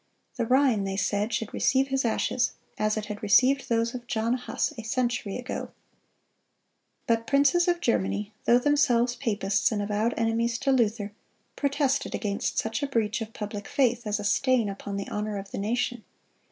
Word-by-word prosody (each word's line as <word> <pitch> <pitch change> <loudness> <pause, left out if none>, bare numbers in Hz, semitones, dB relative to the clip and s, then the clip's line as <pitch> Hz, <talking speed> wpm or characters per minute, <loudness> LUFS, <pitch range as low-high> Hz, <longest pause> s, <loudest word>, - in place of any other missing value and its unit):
"The 230 - -1
Rhine," 255 -5 +3
they 195 0 -3
said, 205 +3 0
"should 220 -1 -2
receive 265 +1 +2
his 270 0 +1
ashes, 235 +2 0 0.3
as 215 0 +1
it 215 - -3
had 210 -1 -6
received 255 +7 +4
those 230 0 +1
of 245 -1 -7
John 230 0 0
Huss 250 +4 -2
a 225 - -6
century 235 -2 -1
ago."(224) 250 +1 -5 1.3
But 230 0 +1
princes 285 +6 +3
of 350 -1 +1
Germany, 210 - 0
though 240 - +6
themselves 250 -3 +2
papists 210 -5 0
and 215 - -1
avowed 210 +3 0
enemies 230 +1 +1
to 275 +1 0
Luther, 220 -5 +1 0.4
protested 280 -1 0
against 200 -2 -2
such 220 0 -1
a 285 - 0
breach 230 -4 0
of 225 0 -6
public 210 -1 -6
faith, 245 -4 +1
as 210 0 0
a - - -4
stain 245 +1 +2
upon 200 0 -5
the 200 - -4
honor 210 0 -3
of 195 0 -8
the - - -4
nation. 240 +2 -1
230 Hz, 175 wpm, -27 LUFS, 210-255 Hz, 1.3 s, though